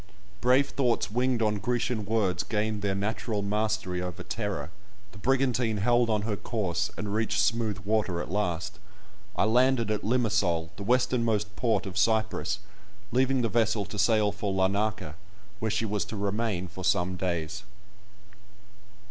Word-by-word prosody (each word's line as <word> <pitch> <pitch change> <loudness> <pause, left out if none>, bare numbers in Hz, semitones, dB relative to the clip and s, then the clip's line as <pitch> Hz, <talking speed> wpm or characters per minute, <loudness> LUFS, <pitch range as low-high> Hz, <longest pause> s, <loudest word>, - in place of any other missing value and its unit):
Brave 130 +3 +4
thoughts 120 -6 +1
winged 125 0 +1
on 105 -1 +1
Grecian 120 0 -1
words 100 -5 +1
gained 105 +1 -1
their 100 -1 0
natural 105 +1 -2
mastery 105 -3 -1
over 90 0 -5
terror; 95 -8 -3 0.4
the 100 - -13
brigantine 125 -2 +1
held 120 +3 +3
on 105 -2 +1
her 105 -1 -1
course, 100 -5 -1
and 100 -1 -3
reached 110 -1 0
smooth 110 0 +1
water 105 -4 +1
at 85 - -5
last. 100 +1 -2 0.6
I - - +2
landed 120 0 +3
at 105 -1 0
Limasol, 105 -9 +1
the - - -9
westernmost 115 -3 +1
port 110 +1 +1
of 95 0 -3
Cyprus, 110 +1 +1 0.5
leaving 130 +1 +2
the - - +3
vessel 110 -2 +1
to 105 +2 -6
sail 105 0 +3
for 100 0 -3
Larnaka, 95 -3 0 0.5
where 110 - -1
she 110 +1 0
was 105 -1 -1
to 105 +1 -6
remain 100 -2 -1
for 95 +2 -8
some 95 -1 +1
days. 90 +1 -2
105 Hz, 150 wpm, -28 LUFS, 100-115 Hz, 0.6 s, Brave